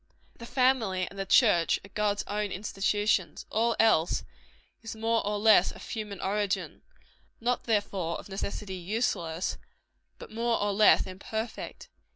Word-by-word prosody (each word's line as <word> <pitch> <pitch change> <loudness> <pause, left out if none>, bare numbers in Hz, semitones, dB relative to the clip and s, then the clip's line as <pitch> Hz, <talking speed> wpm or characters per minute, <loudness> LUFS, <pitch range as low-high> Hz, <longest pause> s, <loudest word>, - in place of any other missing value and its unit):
_ - - -30
The 235 - -8
family 235 -9 +1
and 195 - -10
the 195 - -3
church 190 -8 +4
are - - -14
God's 210 -1 0
own 210 -1 -2
institutions. 195 -3 -1
All 230 +1 +1
else, 175 -7 +3 0.6
is 225 -1 -7
more 225 +1 0
or 210 +1 -1
less 210 -3 +5
of - - -11
human 210 -3 -5
origin: 200 0 -2 0.6
not, 245 +1 -1
therefore, 200 -6 -1
of - - -10
necessity, 195 0 -5
useless 180 -3 -2 0.6
but - - -11
more 230 +1 0
or 205 0 0
less 210 +2 +5
imperfect. 220 +4 -6
205 Hz, 145 wpm, -28 LUFS, 190-225 Hz, 0.6 s, less